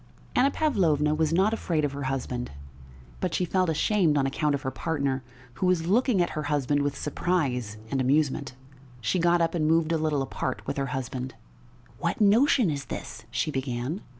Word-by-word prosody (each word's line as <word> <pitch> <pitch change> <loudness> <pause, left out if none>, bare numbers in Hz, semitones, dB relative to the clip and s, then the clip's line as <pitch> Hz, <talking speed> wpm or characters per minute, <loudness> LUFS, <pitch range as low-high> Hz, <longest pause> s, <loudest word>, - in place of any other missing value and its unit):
Anna 265 +2 +5
Pavlovna 170 - +2
was 155 0 +1
not 190 +6 +3
afraid 165 -8 0
of 145 - -2
her 140 0 -5
husband, 130 -2 -3 0.7
but - - -1
she 180 - +1
felt 185 0 +1
ashamed 160 0 +2
on 135 - +2
account 145 +2 +1
of 140 - -5
her 130 - -2
partner, 140 -5 -1 0.4
who 185 - +3
was 180 -3 +2
looking 215 0 +3
at - - -3
her 155 - -3
husband 145 -1 +1
with 145 0 -1
surprise 135 - -1
and 135 - +1
amusement. 140 0 +1 0.4
She 120 +10 0
got 170 0 +3
up 165 0 +1
and 155 -3 +1
moved 165 0 +3
a 165 - +1
little 150 -3 +1
apart 130 -1 -4
with - - -3
her 135 0 -1
husband. 130 -1 -4 0.6
"What 170 - -1
notion 225 - +4
is 140 -1 -4
this?" 115 0 -7
she 150 +7 -1
began. 130 - -3
150 Hz, 185 wpm, -27 LUFS, 135-175 Hz, 0.7 s, Anna